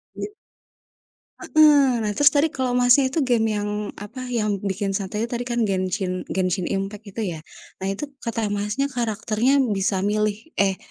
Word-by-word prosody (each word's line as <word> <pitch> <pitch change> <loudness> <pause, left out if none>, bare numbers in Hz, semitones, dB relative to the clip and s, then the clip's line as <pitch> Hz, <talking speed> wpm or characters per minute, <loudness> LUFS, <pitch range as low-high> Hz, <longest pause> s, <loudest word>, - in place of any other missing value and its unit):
Iya. - - -4 1.1
Heeh, 285 -6 +4
nah 210 - 0
terus 290 +8 +3
tadi 295 +2 +3
kalau 260 -4 -1
Masnya 250 +2 +5
itu 280 +3 0
game 240 -3 +2
yang, 205 0 -2 0.3
apa, 245 +6 -8
yang 215 -5 -1
bikin 195 0 -2
santai 195 +2 -2
itu 235 - -4
tadi 245 0 -3
kan 240 -1 0
Genshin 185 -2 -1
Genshin 185 -1 -1
Impact, 195 +2 -4
gitu 210 +3 -4
ya. 175 -6 -3 0.4
Nah 190 - -3
itu 205 +10 -4
kata 225 -3 -2
Masnya 210 +8 -1
karakternya 225 +1 0 0.2
bisa 195 -1 0
milih 210 0 +1 0.2
eh 195 -1 +3
215 Hz, 165 wpm, -23 LUFS, 195-245 Hz, 1.1 s, Masnya